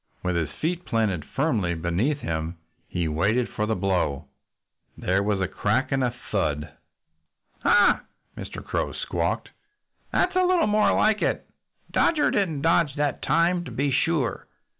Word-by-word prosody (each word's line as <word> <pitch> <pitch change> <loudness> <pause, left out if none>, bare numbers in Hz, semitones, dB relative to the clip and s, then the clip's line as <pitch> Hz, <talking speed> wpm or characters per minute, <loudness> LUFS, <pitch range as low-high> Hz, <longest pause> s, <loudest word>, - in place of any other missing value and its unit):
With 90 -1 0
his 80 -3 0
feet 175 +2 -2
planted 105 - 0
firmly 110 - 0
beneath 90 - 0
him 80 +1 -3 0.3
he 85 -2 -2
waited 100 +11 +1
for 105 - -2
the 110 - +1
blow. 90 -7 0 0.7
There 95 +2 +1
was 100 -1 0
a 95 - 0
crack 105 +9 0
and 135 -1 +1
a 125 - +2 0.2
thud. 75 -7 -1 0.9
"Ha!" 205 -1 +5 0.3
Mr. - - -8
Crow - - -2
squawked. - - -2 0.6
"That's - - +1
a 370 - +4
little 365 -2 +3
more 210 0 +3
like 215 -1 +3
it. - - 0 0.5
Dodger 310 -3 +3
didn't 160 -8 0
dodge 165 -3 +3
that 145 -1 -1
time, 175 +1 +2
to - - -7
be 140 +1 -1
sure. 135 0 0
115 Hz, 150 wpm, -25 LUFS, -, 0.9 s, Ha